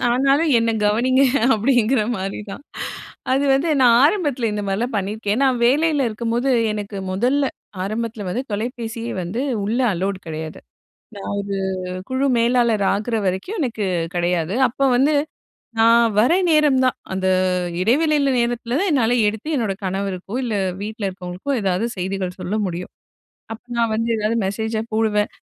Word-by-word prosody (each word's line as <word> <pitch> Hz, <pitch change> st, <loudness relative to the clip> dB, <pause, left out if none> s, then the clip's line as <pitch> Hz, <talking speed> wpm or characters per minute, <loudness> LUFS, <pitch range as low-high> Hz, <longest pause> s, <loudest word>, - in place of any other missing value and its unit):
ஆனாலும் 275 Hz, +6 st, +3 dB
என்ன 230 Hz, 0 st, +1 dB, 0.2 s
கவனிங்க" 255 Hz, +6 st, +3 dB, 0.3 s
அப்டிங்கிற 240 Hz, +1 st, +2 dB
மாரிதான். 195 Hz, +5 st, -6 dB, 0.7 s
அது 275 Hz, +2 st, +2 dB
வந்து 275 Hz, +5 st, +2 dB
நான் 235 Hz, -2 st, +6 dB
ஆரம்பத்தில 290 Hz, -, +1 dB
இந்த 210 Hz, 0 st, -2 dB
மாரிலாம் 225 Hz, +5 st, -1 dB
பண்ணியிருக்கேன். 205 Hz, +3 st, -1 dB
நான் 255 Hz, -3 st, +2 dB
வேலையில 290 Hz, 0 st, +2 dB
இருக்கும்போது 235 Hz, +4 st, -1 dB, 0.2 s
எனக்கு 205 Hz, -1 st, -5 dB, 0.2 s
முதல்ல 260 Hz, +8 st, +1 dB, 0.3 s
ஆரம்பத்தில 220 Hz, +1 st, -3 dB
வந்து 245 Hz, +7 st, -2 dB
தொலைபேசியே 230 Hz, +1 st, -4 dB
வந்து 185 Hz, +8 st, -3 dB, 0.2 s
உள்ள 220 Hz, +4 st, -1 dB
அலோட் 190 Hz, +1 st, -3 dB
கெடையாது. 160 Hz, 0 st, -6 dB, 0.6 s
நான் 200 Hz, 0 st, -5 dB
ஒரு 200 Hz, 0 st, -4 dB, 0.5 s
குழு 260 Hz, +1 st, 0 dB
மேலாளர் 235 Hz, -3 st, +2 dB
ஆகுற 220 Hz, +3 st, -1 dB
வரைக்கும் 190 Hz, -, -2 dB
எனக்கு 225 Hz, -6 st, -2 dB, 0.3 s
கெடையாது. 175 Hz, 0 st, 0 dB, 0.2 s
அப்ப 275 Hz, +3 st, 0 dB
வந்து 285 Hz, +4 st, +3 dB, 0.7 s
நான் 230 Hz, 0 st, +5 dB
வர 245 Hz, +9 st, +4 dB, 0.2 s
நேரம் 300 Hz, -4 st, +4 dB
தான், 255 Hz, -, +1 dB, 0.2 s
அந்த 190 Hz, 0 st, -1 dB, 0.5 s
இடைவெளில 285 Hz, -, +2 dB
நேரத்தில 235 Hz, +1 st, -1 dB
தான் 400 Hz, -, +1 dB
என்னால 245 Hz, -4 st, +2 dB
எடுத்து 220 Hz, +8 st, -2 dB
என்னோட 215 Hz, -6 st, -1 dB
கணவருக்கோ, 190 Hz, +1 st, -3 dB
இல்ல 230 Hz, -, -2 dB, 0.3 s
வீட்ல 215 Hz, -1 st, -4 dB
இருக்கவங்களுக்கோ 185 Hz, +7 st, -5 dB
ஏதாவது 190 Hz, +3 st, 0 dB
செய்திகள் 185 Hz, 0 st, -3 dB
சொல்ல 185 Hz, +3 st, -3 dB
முடியும். 180 Hz, 0 st, -5 dB, 0.6 s
அப்ப 225 Hz, -, -9 dB, 0.2 s
நான் 230 Hz, -1 st, +2 dB
வந்து 230 Hz, +1 st, -1 dB
எதாவது 215 Hz, +2 st, 0 dB
மெசேஜ 220 Hz, +3 st, -3 dB, 0.2 s
போடுவேன். 210 Hz, -2 st, +1 dB
225 Hz, 140 wpm, -21 LUFS, 200-255 Hz, 0.7 s, நான்